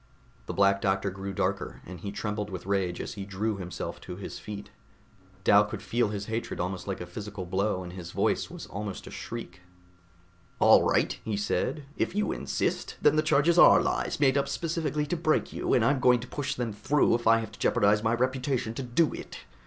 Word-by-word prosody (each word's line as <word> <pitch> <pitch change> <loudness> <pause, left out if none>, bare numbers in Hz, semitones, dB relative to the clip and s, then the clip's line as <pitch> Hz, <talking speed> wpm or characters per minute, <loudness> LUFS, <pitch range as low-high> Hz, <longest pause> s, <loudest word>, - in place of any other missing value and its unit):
The - - -3
Black 100 0 +4
Doctor 95 0 +1
grew 95 +1 -5
darker, 95 - -2
and 90 -1 -9
he 100 +3 -5
trembled 105 0 -3
with 95 -2 -6
rage 95 -3 0
as - - -5
he 100 - -6
drew 100 +2 -2
himself 90 -2 -6
to 90 - -7
his 95 - -7
feet. 105 -1 -8 0.7
Dal 100 +2 +6
could 105 - -6
feel 120 -2 +1
his 105 -1 -4
hatred 115 +2 -4
almost 90 +1 -3
like 95 - -3
a - - -4
physical 100 +1 -7
blow 95 +1 0
and 90 0 -8
his 90 -2 -7
voice - - 0
was - - -8
almost 100 -1 -6
a - - -9
shriek. 90 -6 -7 1.0
"All - - +7
right," - - +1
he 110 -2 -2
said, 125 +8 -1
"if - - -1
you 210 - +1
insist, - - -2
then - - +4
the 155 - +4
charges 155 +3 +3
are - - +9
lies, - - -1
made 140 -1 +4
up 140 0 -2
specifically 155 -1 -1
to 150 - -2
break 160 -2 +1
you, - - -2
and 115 - +3
I'm 135 +1 +3
going 125 -1 +5
to 125 - -8
push 140 +1 -3
them 120 -3 -3
through 130 +8 +2
if 120 -1 0
I 115 0 +7
have 110 -2 -4
to - - -14
jeopardize 105 +1 +3
my 110 +1 +2
reputation 130 -1 -1
to 125 - -4
do 130 +6 +1
it. - - -8
105 Hz, 210 wpm, -28 LUFS, 100-130 Hz, 1.0 s, are